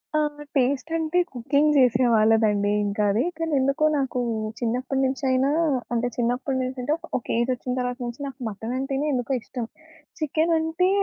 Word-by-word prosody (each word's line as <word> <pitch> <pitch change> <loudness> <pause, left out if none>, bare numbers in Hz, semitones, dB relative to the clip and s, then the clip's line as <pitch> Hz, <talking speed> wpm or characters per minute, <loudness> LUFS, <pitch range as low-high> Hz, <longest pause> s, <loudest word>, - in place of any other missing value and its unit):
ఆ! - - +4 0.4
టేస్ట్ 275 +4 +1
అంటే, 325 +2 +1
కుకింగ్ 285 +5 +2
జేసేవాళ్ళదండి 225 -4 +4
ఇంకా 205 +1 -1
అది. 225 +6 +2
కానెందుకో 290 -2 +1
నాకు 260 -2 -1 0.4
చిన్నప్పటినుంచైనా 260 +2 0 0.4
అంటే, 240 +1 +1
చిన్నప్పటి 250 +3 0
నుంచి 255 +1 -4
అంటే, 295 +4 +1 0.2
ఒక 240 - -7
ఏజ్ 240 +2 +1
ఒచ్చిన 250 +1 -4
తర్వాత 250 0 -2
నుంచి 240 +3 -6
నాకు 265 0 -9
మటను 225 +4 -5
అంటేనే 270 +2 -1
ఎందుకో 250 +1 -1
ఇష్టం. 230 +2 -5 0.5
చికెను 315 +2 +1
అంటే, 320 +3 +1
260 Hz, 140 wpm, -24 LUFS, 235-280 Hz, 0.5 s, ఆ